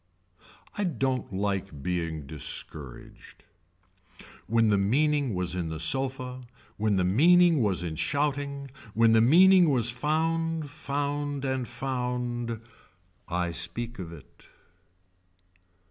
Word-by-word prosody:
I -, -, +2 dB
don't 135 Hz, -, -1 dB
like 95 Hz, -6 st, -3 dB
being 85 Hz, -4 st, -2 dB
discouraged. 70 Hz, -2 st, -8 dB, 1.0 s
When 115 Hz, -1 st, +3 dB
the 100 Hz, -, +3 dB
meaning 140 Hz, +3 st, +1 dB
was 90 Hz, -1 st, -1 dB
in 85 Hz, -3 st, -2 dB
the 80 Hz, -1 st, -5 dB
sofa 130 Hz, +7 st, -2 dB, 0.4 s
when 105 Hz, -1 st, +1 dB
the 95 Hz, -, +2 dB
meaning 165 Hz, -, +5 dB
was 95 Hz, -5 st, +1 dB
in 85 Hz, -2 st, -3 dB
shouting 140 Hz, -, -2 dB, 0.2 s
when 115 Hz, 0 st, +5 dB
the 110 Hz, -, +6 dB
meaning 180 Hz, +7 st, +6 dB
was 120 Hz, -4 st, +1 dB
found 160 Hz, +3 st, -1 dB
found 145 Hz, 0 st, -3 dB
and 130 Hz, -2 st, -1 dB
found. 125 Hz, -2 st, -3 dB, 0.7 s
I 90 Hz, 0 st, -1 dB
speak 120 Hz, +6 st, -4 dB
of 85 Hz, -3 st, -6 dB
it. 75 Hz, -5 st, -15 dB
125 Hz, 115 wpm, -27 LUFS, 95-145 Hz, 1.0 s, the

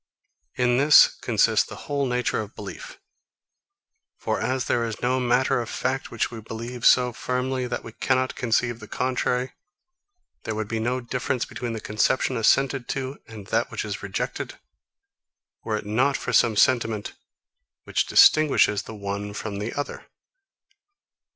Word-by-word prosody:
In 125 Hz, -1 st, +2 dB
this 145 Hz, +2 st, +7 dB
consists -, -, +3 dB
the -, -, -10 dB
whole 140 Hz, -1 st, -1 dB
nature 125 Hz, -2 st, 0 dB
of 105 Hz, 0 st, -9 dB
belief. -, -, -9 dB, 1.2 s
For -, -, -2 dB
as 130 Hz, -1 st, -1 dB
there 120 Hz, -, +1 dB
is 115 Hz, -2 st, -4 dB
no 130 Hz, +1 st, +1 dB
matter 125 Hz, 0 st, +2 dB
of 115 Hz, -, -6 dB
fact 130 Hz, +1 st, -2 dB
which 115 Hz, -, -2 dB
we 115 Hz, -2 st, -8 dB
believe 115 Hz, +2 st, -3 dB
so 125 Hz, -1 st, +5 dB
firmly 125 Hz, +1 st, -2 dB
that 120 Hz, 0 st, -4 dB
we 115 Hz, -, -9 dB
cannot 130 Hz, +3 st, 0 dB
conceive 120 Hz, -1 st, 0 dB
the 110 Hz, -, -11 dB
contrary, 125 Hz, +1 st, -1 dB, 0.9 s
there 110 Hz, -, -4 dB
would 110 Hz, -1 st, -3 dB
be 115 Hz, +1 st, -2 dB
no 125 Hz, +3 st, -1 dB
difference 125 Hz, 0 st, -2 dB
between 120 Hz, -2 st, -5 dB
the 110 Hz, -, -4 dB
conception 110 Hz, +5 st, 0 dB
assented 130 Hz, +3 st, +2 dB
to 135 Hz, 0 st, -4 dB
and 110 Hz, -3 st, -10 dB
that -, -, +1 dB
which -, -, -4 dB
is -, -, -5 dB
rejected, -, -, -4 dB, 1.1 s
were 110 Hz, -1 st, -1 dB
it 105 Hz, -, -7 dB
not 130 Hz, +7 st, +1 dB
for 125 Hz, -, -4 dB
some 115 Hz, -1 st, +4 dB
sentiment 115 Hz, -3 st, +2 dB, 0.7 s
which -, -, -1 dB
distinguishes 140 Hz, -9 st, +5 dB
the 110 Hz, -, -10 dB
one 100 Hz, 0 st, -5 dB
from 105 Hz, -2 st, -5 dB
the 105 Hz, +3 st, -3 dB
other. 145 Hz, -, -5 dB
120 Hz, 155 wpm, -24 LUFS, 110-130 Hz, 1.2 s, this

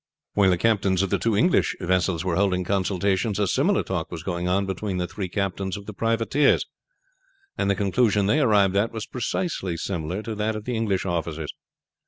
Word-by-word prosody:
While 100 Hz, -2 st, +4 dB
the 90 Hz, -, +3 dB
captains 100 Hz, -2 st, +2 dB
of 95 Hz, -, -2 dB
the -, -, +2 dB
two 115 Hz, -3 st, +1 dB
English 175 Hz, -, +3 dB
vessels 90 Hz, -1 st, 0 dB
were 90 Hz, -3 st, 0 dB
holding 95 Hz, -1 st, +1 dB
consultations 95 Hz, +2 st, 0 dB
a 105 Hz, -, +2 dB
similar -, -, +2 dB
talk -, -, -3 dB
was 80 Hz, -2 st, -7 dB
going 90 Hz, -1 st, -2 dB
on 95 Hz, +2 st, +1 dB
between 95 Hz, 0 st, -3 dB
the 90 Hz, -, -1 dB
three 95 Hz, +1 st, -5 dB
captains 95 Hz, 0 st, -2 dB
of 100 Hz, -, -10 dB
the 110 Hz, -, -7 dB
privateers, 115 Hz, +7 st, +2 dB, 0.9 s
and -, -, 0 dB
the 100 Hz, -, +3 dB
conclusion 100 Hz, +1 st, +2 dB
they 105 Hz, +9 st, +3 dB
arrived 105 Hz, -8 st, +3 dB
at 105 Hz, +3 st, +2 dB
was 110 Hz, -1 st, -5 dB
precisely 120 Hz, -, -2 dB
similar 90 Hz, +2 st, -3 dB
to 115 Hz, -, -4 dB
that 110 Hz, +1 st, -1 dB
of 110 Hz, 0 st, -6 dB
the 125 Hz, -, -2 dB
English 105 Hz, -5 st, 0 dB
officers. 80 Hz, -3 st, -3 dB
100 Hz, 195 wpm, -24 LUFS, 90-110 Hz, 0.9 s, While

